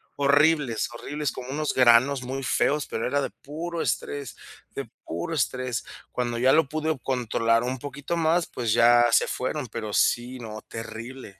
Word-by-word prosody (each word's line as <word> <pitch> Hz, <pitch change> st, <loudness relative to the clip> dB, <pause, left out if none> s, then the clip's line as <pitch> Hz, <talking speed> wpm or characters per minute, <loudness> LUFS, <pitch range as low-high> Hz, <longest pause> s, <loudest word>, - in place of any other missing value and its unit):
Horribles, 145 Hz, -3 st, +3 dB
horribles, 145 Hz, +3 st, -3 dB
como 125 Hz, 0 st, -8 dB
unos 150 Hz, +2 st, -1 dB
granos 130 Hz, +2 st, +5 dB
muy 135 Hz, +2 st, -4 dB
feos, 145 Hz, +3 st, +1 dB
pero 110 Hz, -, -3 dB
era 145 Hz, +3 st, +1 dB
de -, -, -3 dB
puro 165 Hz, +4 st, -5 dB
estrés 140 Hz, -4 st, -3 dB, 0.4 s
de -, -, -3 dB, 0.2 s
puro 85 Hz, -, -4 dB
estrés. 125 Hz, -4 st, -1 dB, 0.3 s
Cuando 120 Hz, -1 st, -2 dB
ya 130 Hz, +3 st, +4 dB
lo 160 Hz, -4 st, +3 dB
pude 155 Hz, 0 st, -1 dB
controlar 115 Hz, -2 st, +1 dB
un 130 Hz, +1 st, -2 dB
poquito 145 Hz, +4 st, -4 dB
más, 165 Hz, +1 st, +2 dB
pues 120 Hz, -3 st, -2 dB
ya 120 Hz, +1 st, +6 dB
se -, -, +4 dB
fueron, 130 Hz, +2 st, -3 dB
pero 110 Hz, -1 st, -5 dB
sí, 120 Hz, +4 st, +1 dB
no, 110 Hz, -2 st, -7 dB
terrible. 115 Hz, -2 st, -8 dB
130 Hz, 165 wpm, -26 LUFS, 120-145 Hz, 0.4 s, ya